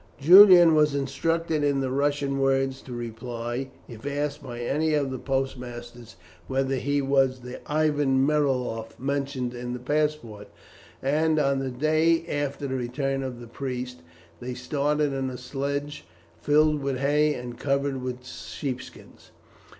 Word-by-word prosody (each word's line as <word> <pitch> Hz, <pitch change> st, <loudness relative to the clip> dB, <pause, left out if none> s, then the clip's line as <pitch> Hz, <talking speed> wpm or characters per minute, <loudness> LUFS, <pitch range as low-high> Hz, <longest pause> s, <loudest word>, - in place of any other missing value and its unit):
Julian 175 Hz, +1 st, +9 dB
was 150 Hz, -2 st, +3 dB
instructed 155 Hz, +3 st, -1 dB
in 140 Hz, -1 st, +2 dB
the 130 Hz, -1 st, -1 dB
Russian 140 Hz, 0 st, 0 dB
words 135 Hz, 0 st, +1 dB
to 130 Hz, -, -12 dB
reply 120 Hz, +2 st, -5 dB, 0.2 s
if 115 Hz, -1 st, -11 dB
asked 145 Hz, +1 st, -2 dB
by 120 Hz, -3 st, -7 dB
any 150 Hz, +5 st, 0 dB
of 140 Hz, -3 st, 0 dB
the 130 Hz, -, -4 dB
postmasters 120 Hz, -3 st, -4 dB, 0.3 s
whether 135 Hz, 0 st, 0 dB
he 140 Hz, +2 st, 0 dB
was 135 Hz, -2 st, +2 dB
the 125 Hz, +1 st, -8 dB
Ivan 145 Hz, -3 st, +2 dB
Meriloff 130 Hz, -6 st, -1 dB
mentioned 135 Hz, -2 st, -2 dB
in 120 Hz, 0 st, -5 dB
the 125 Hz, -, -5 dB
passport, 145 Hz, -6 st, -2 dB, 0.6 s
and, 155 Hz, +3 st, +2 dB
on 140 Hz, -2 st, +2 dB
the 135 Hz, -1 st, -2 dB
day 155 Hz, +5 st, +2 dB
after 145 Hz, -1 st, -3 dB
the 135 Hz, -, -3 dB
return 135 Hz, +2 st, -2 dB
of 130 Hz, -2 st, -5 dB
the 120 Hz, -, -9 dB
priest, 125 Hz, 0 st, -5 dB, 0.4 s
they 125 Hz, 0 st, -5 dB
started 145 Hz, +3 st, 0 dB
in 135 Hz, -1 st, -2 dB
a 125 Hz, -, -6 dB
sledge 140 Hz, +3 st, -4 dB, 0.4 s
filled 150 Hz, 0 st, +3 dB
with 135 Hz, -1 st, -1 dB
hay 150 Hz, +2 st, +2 dB
and 120 Hz, -1 st, -7 dB
covered 140 Hz, -1 st, -1 dB
with 125 Hz, 0 st, -5 dB
sheep 130 Hz, 0 st, -5 dB
skins. -, -, -15 dB
135 Hz, 150 wpm, -26 LUFS, 125-145 Hz, 0.6 s, Julian